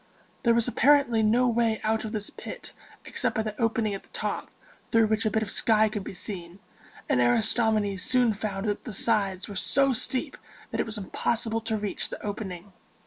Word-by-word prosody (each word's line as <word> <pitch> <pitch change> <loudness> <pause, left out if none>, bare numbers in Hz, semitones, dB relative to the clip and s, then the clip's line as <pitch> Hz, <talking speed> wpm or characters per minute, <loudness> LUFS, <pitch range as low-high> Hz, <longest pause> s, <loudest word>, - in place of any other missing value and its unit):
There 235 -1 +3
was 235 0 +3
apparently 250 -2 +4
no 235 +4 +3
way 230 -2 +1
out 220 0 0
of 215 - -5
this 210 -2 -3
pit - - -8 0.3
except - - -2
by 220 - +1
the 215 0 -5
opening 225 -2 +1
at 195 - -5
the - - -24
top, - - -3 0.4
through 225 -1 +4
which 220 +1 +1
a - - +3
bit 220 +1 0
of 200 - -5
sky 220 -1 +3
could 210 -2 -4
be 190 - -8
seen; 180 -3 -6 0.5
and 125 - +2
Aristomenes 210 - +2
soon 250 -1 +3
found 200 -1 -4
that 205 - -2
the 225 - -6
sides 195 -3 +1
were 205 - -8
so 275 +7 +2
steep 260 +4 0 0.3
that - - -3
it - - 0
was 220 0 -4
impossible 225 +3 -1
to 220 -1 -1
reach 205 -1 -3
the - - -7
opening. 200 -2 -6
220 Hz, 195 wpm, -27 LUFS, 205-230 Hz, 0.5 s, apparently